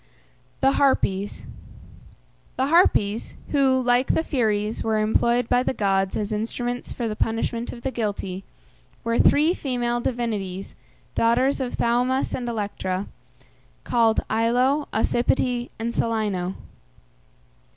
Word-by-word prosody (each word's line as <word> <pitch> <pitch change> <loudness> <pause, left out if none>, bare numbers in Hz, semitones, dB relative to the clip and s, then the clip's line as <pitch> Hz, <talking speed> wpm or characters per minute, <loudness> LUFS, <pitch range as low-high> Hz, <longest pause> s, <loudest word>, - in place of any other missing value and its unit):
THE 270 - +5
HARPIES. 205 -7 +1 1.1
The 260 - +2
Harpies, 235 - +2 0.2
who, 270 -3 +3
like 245 +1 +2
the 320 - +1
Furies, 215 -7 0
were 220 -1 +1
employed 235 +2 +2
by 245 +1 +3
the 255 - -1
gods 195 -2 +1
as 210 0 -3
instruments 240 +3 -3
for 235 - -3
the 215 - -3
punishment 230 +2 -1
of 235 - -10
the 265 - -1
guilty, 200 -5 -3 0.6
were 230 0 0
three 310 +4 +5
female 240 -6 -1
divinities, 210 -7 -3 0.4
daughters 250 +5 +2
of 250 -2 -3
Thaumas 250 +3 +1
and 245 -2 -3
Electra, 200 -4 -3 0.8
called 230 -2 +2
Aello, 250 +6 +2
Ocypete, 240 +2 +1
and 230 +1 -3
Celæno. 205 -5 -1
235 Hz, 120 wpm, -24 LUFS, 215-250 Hz, 1.1 s, THE